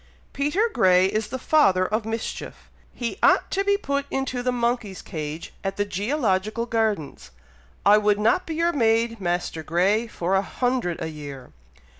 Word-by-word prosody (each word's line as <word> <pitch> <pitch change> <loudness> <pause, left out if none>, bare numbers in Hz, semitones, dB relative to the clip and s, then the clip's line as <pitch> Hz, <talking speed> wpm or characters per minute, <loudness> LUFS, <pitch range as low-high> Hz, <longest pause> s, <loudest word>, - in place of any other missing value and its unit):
Peter 295 +11 +1
Grey 185 0 +5
is 215 +2 -1
the 260 - -4
father 215 -10 +3
of 215 +3 -2
mischief! 225 0 -5 0.2
he 235 -2 -5
ought - - +4
to 390 - +1
be 400 0 +2
put 280 -6 -2
into 265 -2 -2
the 250 0 0
monkey's 235 -5 -1
cage 155 -2 -6
at 195 0 -3
the 205 - +1
GEOlogical 215 - -1
gardens! 215 - -1 0.6
I 205 +1 +7
would 210 -1 +2
not 225 - +2
be 320 - -3
your 340 +1 +1
maid, 230 -2 +2
Master 175 -2 -2
Grey, 190 +8 +1
for 180 -3 -2
a 190 - +4
hundred 245 -4 -1
a - - -2
year." 145 -4 -9
215 Hz, 165 wpm, -24 LUFS, 185-250 Hz, 0.6 s, I